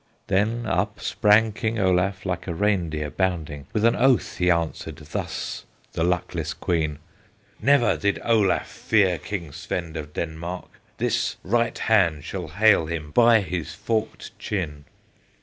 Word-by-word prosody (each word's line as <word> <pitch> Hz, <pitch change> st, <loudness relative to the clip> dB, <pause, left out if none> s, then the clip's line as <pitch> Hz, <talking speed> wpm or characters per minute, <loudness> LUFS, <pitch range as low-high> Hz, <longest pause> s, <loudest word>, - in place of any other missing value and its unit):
Then 110 Hz, +3 st, 0 dB
up -, -, -1 dB
sprang 110 Hz, +1 st, +3 dB
King 110 Hz, +2 st, -2 dB
Olaf, 95 Hz, 0 st, +1 dB
Like 90 Hz, -1 st, -3 dB
a 85 Hz, -, -3 dB
reindeer 80 Hz, -7 st, 0 dB
bounding, 80 Hz, -4 st, -2 dB
With 110 Hz, +1 st, +1 dB
an 115 Hz, -, +4 dB
oath 130 Hz, -1 st, +2 dB
he 90 Hz, 0 st, +3 dB
answered 85 Hz, -2 st, -1 dB
Thus 75 Hz, 0 st, -5 dB, 0.3 s
the 80 Hz, -, -1 dB
luckless 85 Hz, -2 st, -1 dB
Queen: 80 Hz, -5 st, -1 dB, 0.6 s
"Never 140 Hz, -4 st, +4 dB
yet -, -, -2 dB
did 100 Hz, 0 st, +1 dB
Olaf 110 Hz, -5 st, +2 dB
Fear 95 Hz, -6 st, +1 dB
King 90 Hz, -7 st, -5 dB
Svend 85 Hz, +1 st, -5 dB
of 75 Hz, -2 st, -6 dB
Denmark; 85 Hz, +2 st, -5 dB, 0.3 s
This -, -, 0 dB
right 115 Hz, +4 st, +1 dB
hand 85 Hz, -10 st, +2 dB
shall 90 Hz, +1 st, -5 dB
hale 100 Hz, -1 st, +4 dB
him 80 Hz, -3 st, -4 dB
By 115 Hz, 0 st, +6 dB
his 80 Hz, -4 st, -4 dB
forked 110 Hz, +3 st, -3 dB
chin!" 75 Hz, -8 st, -4 dB
90 Hz, 145 wpm, -24 LUFS, 80-105 Hz, 0.6 s, By